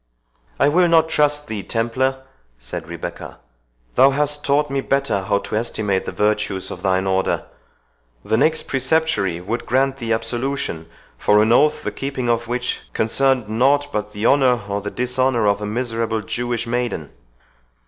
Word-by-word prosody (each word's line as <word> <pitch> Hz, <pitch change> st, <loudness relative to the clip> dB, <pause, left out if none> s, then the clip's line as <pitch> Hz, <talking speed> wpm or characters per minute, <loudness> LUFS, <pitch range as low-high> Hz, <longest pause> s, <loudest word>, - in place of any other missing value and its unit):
"I -, -, +5 dB
will 175 Hz, +4 st, +4 dB
not 165 Hz, -1 st, +4 dB
trust 150 Hz, -1 st, +1 dB
thee, 110 Hz, -2 st, -4 dB
Templar," 130 Hz, +5 st, -1 dB, 0.3 s
said -, -, -7 dB
Rebecca; -, -, -7 dB, 0.6 s
"thou 135 Hz, -, +6 dB
hast 145 Hz, +1 st, 0 dB
taught 145 Hz, +1 st, +1 dB
me 135 Hz, 0 st, 0 dB
better 135 Hz, -8 st, 0 dB
how 100 Hz, +1 st, +1 dB
to 100 Hz, -, -4 dB
estimate 105 Hz, -4 st, 0 dB
the -, -, -2 dB
virtues 105 Hz, -2 st, -1 dB
of -, -, -7 dB
thine 95 Hz, -1 st, +1 dB
Order. 95 Hz, 0 st, 0 dB, 0.8 s
The 110 Hz, -, +1 dB
next 155 Hz, +7 st, +2 dB
Preceptory 130 Hz, -, 0 dB
would 115 Hz, +7 st, -4 dB
grant 135 Hz, +2 st, +1 dB
thee 115 Hz, -3 st, -4 dB
absolution 115 Hz, -7 st, -2 dB, 0.3 s
for 105 Hz, -, +4 dB
an 110 Hz, -, +2 dB
oath, 150 Hz, +5 st, +3 dB
the -, -, -2 dB
keeping 135 Hz, -3 st, -3 dB
of 120 Hz, 0 st, 0 dB
which 125 Hz, +1 st, -2 dB
concerned 130 Hz, +1 st, +1 dB
nought 140 Hz, +6 st, +2 dB
but 105 Hz, 0 st, -2 dB
the 105 Hz, +1 st, -4 dB
honour 125 Hz, -4 st, +4 dB
or 100 Hz, 0 st, -2 dB
the 105 Hz, -, -4 dB
dishonour 125 Hz, -1 st, 0 dB
of 100 Hz, 0 st, +2 dB
a 105 Hz, -, -3 dB
miserable 115 Hz, -1 st, -2 dB
Jewish 120 Hz, +2 st, -3 dB
maiden." 120 Hz, -, -2 dB
120 Hz, 160 wpm, -20 LUFS, 105-135 Hz, 0.8 s, thou